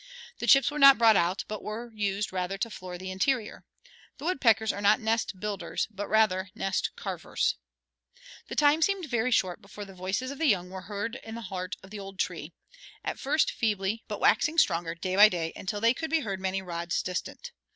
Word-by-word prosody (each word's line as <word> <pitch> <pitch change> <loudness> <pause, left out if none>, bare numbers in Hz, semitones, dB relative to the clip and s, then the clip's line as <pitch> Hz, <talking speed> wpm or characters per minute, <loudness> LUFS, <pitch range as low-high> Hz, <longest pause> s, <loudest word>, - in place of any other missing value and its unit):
The - - -3
chips 275 0 +6
were 300 - -4
not 275 -1 +9
brought 225 -2 +6
out, 175 +1 +1
but 215 -1 -5
were 230 +3 -6
used 205 -2 -2
rather 185 +1 -2
to 230 +3 -3
floor 185 -3 -7
the 185 +1 -6
interior. 220 +4 -1 0.5
The 285 - -9
woodpeckers 225 - +2
are 205 - -6
not 205 +3 +4
nest 220 -4 -1
builders, 200 -4 -3
but 205 0 -5
rather 195 -4 +2
nest 195 -1 -1
carvers. - - -2 0.9
The - - -6
time 300 +2 +4
seemed 390 +1 +1
very 240 -3 0
short 185 -7 +1
before 205 +1 -9
the 195 - -12
voices 190 +8 -3
of 280 - -9
the 325 - +2
young 180 -6 +1
were 190 0 -7
heard 210 +4 -3
in 225 0 -8
the 235 - -6
heart 185 -2 -5
of 190 - -14
the 210 - -7
old 195 -1 -9
tree, - - -3 0.5
at - - -4
first 295 +3 +1
feebly, 210 -1 -1
but 210 - -5
waxing 300 +9 +3
stronger 165 - +2
day 185 +2 -3
by 210 +2 +9
day 165 -3 -3
until 205 +2 -4
they 230 +3 +4
could 320 +4 -5
be 325 -1 +2
heard 195 -6 -4
many 190 0 -2
rods 170 -1 -2
distant. 185 - -5
205 Hz, 205 wpm, -28 LUFS, 190-235 Hz, 0.9 s, not